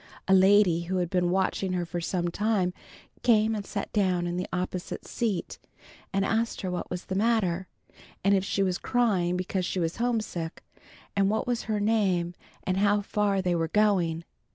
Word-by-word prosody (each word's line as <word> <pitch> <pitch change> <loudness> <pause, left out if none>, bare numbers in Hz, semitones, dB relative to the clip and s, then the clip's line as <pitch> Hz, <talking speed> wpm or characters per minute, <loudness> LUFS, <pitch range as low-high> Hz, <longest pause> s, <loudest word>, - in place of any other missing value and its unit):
A 190 - +4
lady 190 -3 +5
who 185 +2 -1
had 175 -2 -1
been 180 -1 +2
watching 190 0 0
her 175 -1 -1
for 170 +1 -4
some 175 0 -1
time, 200 -1 0 0.5
came 225 -2 +4
and 210 -2 -3
sat 200 0 -5
down 185 -4 +1
in 175 0 -2
the 180 +1 -2
opposite 180 0 -4
seat 220 -7 -2 0.5
and 195 0 +1
asked 225 +2 0
her 185 - -3
what 180 - -4
was 180 0 -5
the - - -4
matter, 190 -4 +1 0.6
and 200 +1 +4
if 190 -1 +3
she 195 0 0
was 185 -2 0
crying 190 -8 +1
because 185 +1 -2
she 185 - -2
was 165 -1 -1
homesick, 220 -9 -2 0.5
and 200 -1 +3
what 220 +1 0
was 245 -1 -1
her 215 -1 +1
name 195 -5 +1 0.3
and 185 0 -1
how 205 +1 +3
far 200 -1 0
they 180 -1 +1
were 165 -1 0
going. 175 -4 +2
190 Hz, 185 wpm, -27 LUFS, 180-210 Hz, 0.6 s, lady